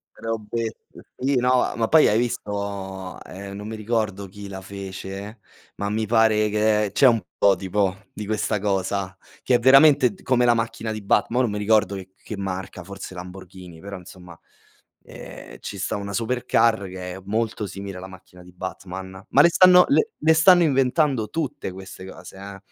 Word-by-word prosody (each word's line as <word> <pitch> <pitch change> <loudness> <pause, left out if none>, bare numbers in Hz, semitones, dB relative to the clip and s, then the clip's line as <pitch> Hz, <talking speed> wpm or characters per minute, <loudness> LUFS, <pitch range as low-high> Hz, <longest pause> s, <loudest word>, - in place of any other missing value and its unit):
Robett 115 0 -4 0.4
sì, 135 +1 0
no 125 0 +2
ma 115 -1 0
poi 160 -1 +6
hai 105 - +2
visto, 100 -5 -4
ehm, 100 +1 -9
non 105 +1 -7
mi 110 - -5
ricordo 105 -3 -2
chi 100 +1 -10
la 95 -1 -7
fece, 100 +2 -8 0.4
ma 100 - -3
mi 110 +1 -1
pare 110 -1 +3
che 105 -1 +2
c'è 135 - +5
un 115 -4 +4 0.2
prototipo 95 0 +1
di 105 - -7
questa 105 0 -1
cosa, 95 -1 -2 0.3
che 125 - +2
è - - +5
veramente 135 0 +6
d - - -17
come 125 -1 +2
la 120 -1 +5
macchina 115 -1 -3
di 110 - -5
Batm 100 +3 +1
mo 125 - +3
non 120 - 0
mi 105 - -3
ricordo 105 -2 +2
c 95 -1 -8
che 110 - -7
marca, 95 -1 -5
forse 95 -1 -9
Lamborghini, 90 -1 -10
però 100 0 -7
insomma, 90 -2 -13 0.7
ehm, - - -11
ci 100 - -7
sta 95 - -2
una 100 0 -5
supercar, 115 -2 +1
che 90 -1 -7
è 95 - -9
molto 110 0 -2
simile 95 0 -7
alla 95 +1 -8
macchina 90 -1 -15
di 90 0 -16
Batman, 95 +1 -8
ma 140 - +6
le 170 - +7
stanno 180 +1 +7
le 440 +11 +3
le 160 0 +4
stanno 175 +2 +6
inventando 135 -4 +2
tutte 150 -11 -3
queste 95 0 -10
cose, 95 0 -11
eh, 100 0 -9
100 Hz, 180 wpm, -23 LUFS, 95-115 Hz, 0.7 s, le